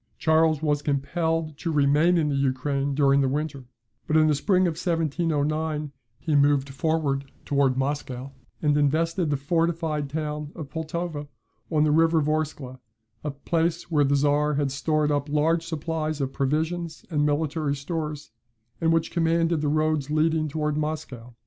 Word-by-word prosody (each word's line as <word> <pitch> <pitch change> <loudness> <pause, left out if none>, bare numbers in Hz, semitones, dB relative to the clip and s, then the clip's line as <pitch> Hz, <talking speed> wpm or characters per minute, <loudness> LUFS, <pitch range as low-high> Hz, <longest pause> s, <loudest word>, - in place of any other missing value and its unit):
Charles 160 -1 +3
was 145 -2 +1
compelled 155 +2 -1
to 165 - -2
remain 150 +4 +3
in 155 -3 +1
the 140 - 0
Ukraine 140 +1 0
during 140 -1 +4
the 135 - +2
winter; 140 -2 -3 0.4
but 155 - +3
in 155 - +5
the 155 - +3
spring 185 +6 +2
of 175 - +2
1709 155 -2 -1 0.3
he 155 - -3
moved 140 -1 +3
forward 140 -2 -1
towards 140 -2 +2
Moscow, 135 -1 -3 0.3
and 145 -1 +3
invested 160 +4 +1
the 145 - +1
fortified 160 0 -1
town 150 0 -4
of 150 -5 -8
Pultowa, 160 -2 -4 0.4
on 155 -2 +2
the 155 - +3
river 165 +1 +4
Vorskla, 150 -4 -2 0.4
a 150 - -2
place 165 +4 -1
where 150 -2 +4
the 140 0 +2
Czar 145 +1 +2
had 140 -1 0
stored 150 +2 0
up 145 0 -1
large 160 +3 +2
supplies 155 -1 -3
of 135 -1 -2
provisions 160 +4 -2
and 150 -2 +1
military 150 0 0
stores, 150 -2 -5 0.5
and 165 0 +3
which 165 0 +1
commanded 165 -1 +1
the 150 - 0
roads 155 -1 +1
leading 155 +1 +1
towards 150 0 -1
Moscow. 130 -6 -5
150 Hz, 155 wpm, -25 LUFS, 145-160 Hz, 0.5 s, in